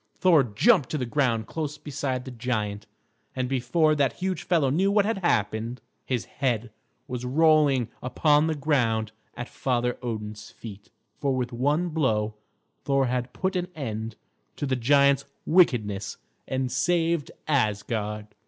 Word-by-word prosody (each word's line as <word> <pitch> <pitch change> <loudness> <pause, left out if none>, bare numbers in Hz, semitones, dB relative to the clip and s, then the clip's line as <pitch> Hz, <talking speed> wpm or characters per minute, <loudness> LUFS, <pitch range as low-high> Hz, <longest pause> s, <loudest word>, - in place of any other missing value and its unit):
Thor 170 -6 +5
jumped 135 - +3
to 155 - -1
the 130 - -2
ground 120 -4 +1
close 150 +3 -4
beside 140 -3 -3
the 130 - -7
giant, 110 -4 -3 0.5
and 130 -1 -1
before 135 +5 +2
that 140 -5 +1
huge 185 0 -3
fellow 155 -7 +2
knew 185 +7 +2
what 205 -1 +3
had 225 -1 -1
happened, 115 - 0 0.2
his 125 -3 -2
head 120 -4 -2 0.4
was 125 -1 -4
rolling 145 -2 +4
upon 150 +4 +3
the 160 - 0
ground 120 -7 +1 0.3
at 120 0 -4
Father 125 -2 -1
Odin's 105 -3 -5
feet; 105 -2 -11 0.3
for 140 -2 0
with 125 -1 -2
one 145 +8 +1
blow 110 -9 0 0.5
Thor 135 -1 +2
had 125 0 -2
put 190 0 -2
an 180 -1 -1
end 110 -6 -4 0.4
to - - -3
the 130 -1 0
giant's 140 +3 +4 0.2
wickedness 110 - +2 0.3
and 130 0 -1
had 125 - -3
saved 165 +3 +1 0.2
Asgard. 105 -5 0
130 Hz, 150 wpm, -26 LUFS, 115-150 Hz, 0.5 s, Thor